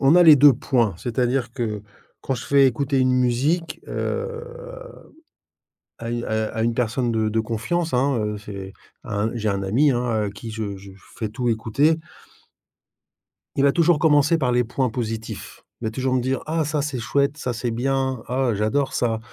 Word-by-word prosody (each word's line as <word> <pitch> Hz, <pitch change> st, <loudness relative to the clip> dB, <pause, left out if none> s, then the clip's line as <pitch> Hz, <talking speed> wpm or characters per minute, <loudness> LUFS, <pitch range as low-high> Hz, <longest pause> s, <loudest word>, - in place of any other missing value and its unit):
on 140 Hz, +3 st, +5 dB
a 180 Hz, -, +8 dB
les 155 Hz, -3 st, +9 dB
2 145 Hz, +1 st, +8 dB
points, 120 Hz, -4 st, +1 dB
c'est-à-dire 120 Hz, +3 st, -1 dB
que 110 Hz, -5 st, -3 dB, 0.4 s
quand 135 Hz, -, -2 dB
je 120 Hz, -, -6 dB
fais 140 Hz, -1 st, +5 dB
écouter 135 Hz, +2 st, 0 dB
une 130 Hz, 0 st, +3 dB
musique, 130 Hz, +7 st, +1 dB
heu, 470 Hz, 0 st, -3 dB, 1.6 s
à 115 Hz, 0 st, -4 dB
u 120 Hz, 0 st, -2 dB
à 110 Hz, 0 st, -1 dB
à 110 Hz, -, 0 dB
une 115 Hz, 0 st, +1 dB
personne 120 Hz, +1 st, 0 dB
de 110 Hz, -1 st, +1 dB
de 110 Hz, +1 st, 0 dB
confiance, 115 Hz, +10 st, -2 dB
hein, 130 Hz, +1 st, +2 dB
heu, 105 Hz, -1 st, -2 dB
c'est 100 Hz, -2 st, -8 dB, 0.3 s
un 105 Hz, +1 st, -1 dB
j'ai 110 Hz, -2 st, -1 dB
un 100 Hz, 0 st, -1 dB
ami, 130 Hz, +10 st, +3 dB
hein, 120 Hz, -1 st, 0 dB, 0.2 s
à -, -, -3 dB
qui 110 Hz, +3 st, -8 dB
je 105 Hz, -3 st, -4 dB
je 95 Hz, 0 st, -12 dB, 0.3 s
fais 110 Hz, -, -3 dB
tout 120 Hz, +3 st, -2 dB
écouter. 140 Hz, +9 st, +2 dB, 1.6 s
Il 135 Hz, -, +2 dB
va 140 Hz, -, +5 dB
toujours 170 Hz, 0 st, +3 dB
commencer 150 Hz, +1 st, +4 dB
par 125 Hz, -4 st, +1 dB
les 125 Hz, 0 st, +3 dB
points 125 Hz, +2 st, -1 dB
positifs. 110 Hz, -2 st, -5 dB, 0.2 s
Il -, -, -4 dB
va 110 Hz, -, -1 dB
toujours 130 Hz, +3 st, -1 dB
me 125 Hz, -, +2 dB
dire: 130 Hz, +2 st, -1 dB
«Ah 160 Hz, 0 st, 0 dB
ça 150 Hz, 0 st, -1 dB
c'est 140 Hz, -2 st, -3 dB
chouette, 140 Hz, +5 st, 0 dB
ça 125 Hz, -4 st, -3 dB
c'est 120 Hz, +1 st, -2 dB
bien, 130 Hz, +1 st, -1 dB
ah 125 Hz, 0 st, +1 dB
j'adore 110 Hz, +7 st, 0 dB
ça. 115 Hz, -2 st, 0 dB
125 Hz, 190 wpm, -23 LUFS, 110-140 Hz, 1.6 s, les